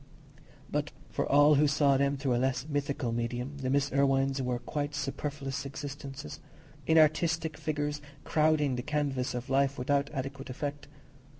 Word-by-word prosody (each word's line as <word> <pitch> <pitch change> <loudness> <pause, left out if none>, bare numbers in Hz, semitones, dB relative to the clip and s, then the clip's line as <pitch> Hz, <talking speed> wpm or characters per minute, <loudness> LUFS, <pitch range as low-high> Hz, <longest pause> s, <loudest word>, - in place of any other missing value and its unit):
But - - -2 0.2
for - - -1
all 145 +2 +7
who 150 - +5
saw 140 -1 +3
them 140 +1 +2
through 135 -2 0
a 120 - +1
less 130 0 0
mythical 140 -4 -1
medium, 120 +4 -3
the 130 -1 -2
Miss 140 +1 +1
Irwines 135 0 +2
were 125 -1 -1
quite 145 +4 -3
superfluous 140 -1 -3
existences—inartistic 150 - -1
figures 150 -1 -2 0.2
crowding 150 -4 +2
the - - -1
canvas 135 -3 -1
of 125 +1 -4
life 140 +1 +2
without 140 +2 +1
adequate 135 0 -5
effect. 145 +3 -4
140 Hz, 140 wpm, -30 LUFS, 135-145 Hz, 0.2 s, all